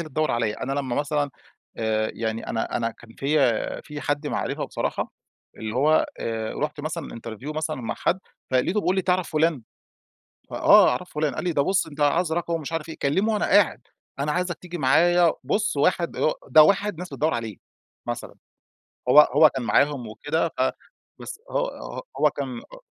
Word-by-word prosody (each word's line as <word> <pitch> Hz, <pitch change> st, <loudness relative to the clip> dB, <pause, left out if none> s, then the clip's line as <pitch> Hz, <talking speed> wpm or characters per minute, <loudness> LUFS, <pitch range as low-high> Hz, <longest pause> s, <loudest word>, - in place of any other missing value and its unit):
اللي 155 Hz, -, -11 dB
تدوّر 155 Hz, +3 st, 0 dB
عليّا. 115 Hz, -3 st, -1 dB
أنا 135 Hz, -, -2 dB
لمّا 135 Hz, -3 st, -2 dB
مثلًا 145 Hz, 0 st, 0 dB, 0.5 s
آآ، 110 Hz, -1 st, 0 dB
يعني 110 Hz, 0 st, -3 dB
أنا 115 Hz, -, -2 dB
أنا 115 Hz, -1 st, -1 dB
كان 115 Hz, 0 st, -16 dB
فيّا 135 Hz, -5 st, +1 dB
في 150 Hz, -1 st, -8 dB
حد 145 Hz, +2 st, -2 dB
معرفه -, -, -2 dB
بصراحة، -, -, -3 dB, 0.4 s
اللي 110 Hz, 0 st, -5 dB
هو 150 Hz, +5 st, +3 dB
آآ، 110 Hz, -1 st, -3 dB
رُحت 150 Hz, 0 st, -3 dB
مثلًا 155 Hz, +2 st, -4 dB
interview 115 Hz, +7 st, -7 dB
مثلًا 155 Hz, 0 st, -2 dB
مع 115 Hz, -, -3 dB
حد، 180 Hz, -, 0 dB, 0.3 s
فلقيته 135 Hz, +11 st, +2 dB
بيقول 185 Hz, -1 st, 0 dB
لي: 190 Hz, -, +1 dB
"تعرف 180 Hz, -1 st, +1 dB
فلان؟" 155 Hz, -4 st, +1 dB, 0.9 s
ف -, -, -11 dB
آه، -, -, +6 dB
أعرف -, -, -3 dB
فلان. 150 Hz, -3 st, -1 dB
قال -, -, -3 dB
لي:" 180 Hz, -, 0 dB
ده 145 Hz, -, +2 dB
بُص، 185 Hz, +3 st, +1 dB
أنت 150 Hz, -1 st, -12 dB
عايز 160 Hz, +3 st, +2 dB
رقمه 170 Hz, 0 st, -1 dB
ومش 160 Hz, -1 st, -5 dB
عارف 165 Hz, 0 st, -3 dB
إيه." 160 Hz, -, -7 dB
كلمه 190 Hz, +11 st, +1 dB
وأنا 210 Hz, -, +1 dB
قاعد. 200 Hz, -3 st, +3 dB, 0.4 s
أنا 150 Hz, +2 st, 0 dB
عايزك 180 Hz, 0 st, -1 dB
تيجي 175 Hz, -1 st, -7 dB
معايّا. 170 Hz, +4 st, +4 dB
بُص، 210 Hz, -7 st, 0 dB
واحد 170 Hz, +3 st, +2 dB, 0.4 s
ده 155 Hz, -1 st, +8 dB
واحد 200 Hz, +1 st, +2 dB
ناس 180 Hz, +1 st, -6 dB
بتدوّر 155 Hz, +1 st, 0 dB
عليه 115 Hz, -4 st, -4 dB, 0.5 s
مثلًا. -, -, -5 dB, 0.7 s
هو 145 Hz, -, +9 dB
هو 150 Hz, +1 st, +6 dB
كان 130 Hz, -3 st, -4 dB
معاهم 125 Hz, +3 st, +2 dB
وكده 150 Hz, +9 st, -1 dB
ف -, -, 0 dB, 0.6 s
بس -, -, -8 dB
هو -, -, 0 dB
ه -, -, -7 dB, 0.2 s
هو -, -, +7 dB
كان 135 Hz, -4 st, -5 dB
آآ، -, -, -14 dB
150 Hz, 185 wpm, -24 LUFS, 130-170 Hz, 0.9 s, هو